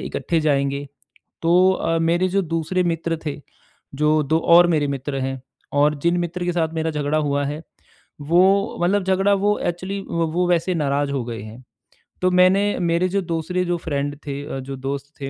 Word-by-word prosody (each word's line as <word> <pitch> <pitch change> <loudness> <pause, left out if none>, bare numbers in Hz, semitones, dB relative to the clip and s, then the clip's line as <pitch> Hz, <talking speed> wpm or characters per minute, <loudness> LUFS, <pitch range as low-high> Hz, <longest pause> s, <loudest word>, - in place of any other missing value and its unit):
इकट्ठे 165 -1 -2
जाएँगे। 140 -2 0 0.6
तो 180 +3 +5
अ, 165 -3 0
मेरे 170 +3 +1
जो 195 +1 +1
दूसरे 180 +3 0
मित्र 165 -1 -1
थे, 150 -1 -4 0.5
जो 150 +2 +2
दो 155 +3 +1 0.2
और 175 - +7
मेरे 150 -2 +1
मित्र 140 0 -4
हैं 135 0 -3 0.4
और 150 +1 +4
जिन 170 +1 +2
मित्र 175 +1 -3
के 175 - 0
साथ 165 -2 -1
मेरा 160 0 -1
झगड़ा 150 0 -1
हुआ 145 -1 0
है, 150 +3 -5 0.6
वो 190 +7 +2
मतलब 195 +3 +2
झगड़ा 190 +2 +2
वो 205 +1 +1
एक्चुअली 185 +3 -3
वो 170 +1 0
वैसे 175 +1 +1
नाराज़ 145 -2 0
हो 135 -3 -2
गए 115 -2 -6
हैं। 115 +4 -11 0.6
तो 185 - +3
मैंने 185 +2 +4 0.2
मेरे 170 +1 +1
जो 200 +2 0
दूसरे 175 +1 -2
जो 175 0 0
फ्रेंड 145 -3 -3
थे, 140 -1 -5
जो 135 +1 -6
दोस्त 140 +2 -5
थे, 135 - -3
165 Hz, 180 wpm, -21 LUFS, 145-180 Hz, 0.6 s, और